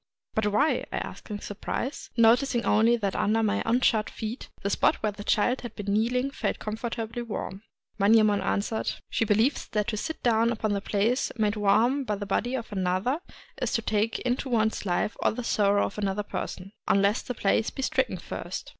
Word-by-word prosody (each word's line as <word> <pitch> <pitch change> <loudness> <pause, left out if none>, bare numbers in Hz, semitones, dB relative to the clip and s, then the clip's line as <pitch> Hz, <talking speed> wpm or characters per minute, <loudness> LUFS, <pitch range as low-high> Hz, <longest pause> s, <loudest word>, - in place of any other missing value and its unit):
"But 220 -1 +1
why?" 245 +10 +2
I - - -2
asked - - -6
in 205 -1 -5
surprise, 245 +6 -4
— - - -34
no 230 - +8
ticing 245 -3 -2
only 225 +3 +4
that 200 -4 -2
under 225 +2 +2
my 215 0 +1
unshod 225 -2 +2
feet, 225 +3 -6
the 200 - 0
spot - - +3
where 215 - +1
the 205 0 -9
child 240 +5 +2
had 240 - -8
been 200 -1 -2
kneeling 250 +5 +1
felt - - -2
comfortably 225 +2 -4
warm. 205 -4 -5 0.4
Manyemon 210 0 +5
answered: 205 +3 -1
— - - -47
"She 225 - +1
believes 220 +6 +2
that 210 -2 -1
to 215 - -2
sit 320 +9 -4
down 230 -1 +3
upon 215 -2 -1
the 200 - -1
place 215 +6 +1
made 210 -1 +1
warm 220 +7 +3
by 215 -5 -1
the 205 0 -5
body 240 +6 0
of 230 -4 -5
another 190 - 0 0.4
is - - -1
to 230 - 0
take 215 +1 0
into 255 +2 -1
one's 220 -2 +1
own - - -1
life 195 +4 0
all - - +2
the 245 - -4
sorrow 205 -2 +2
of - - -5
that 210 - -1
other 195 +2 -1
person, 195 -1 -5
— - - -49
unless 200 +3 +3
the 250 - -5
place 210 +2 +1
be 270 - -5
stricken - - 0
first." - - -6
220 Hz, 210 wpm, -27 LUFS, 205-240 Hz, 0.4 s, no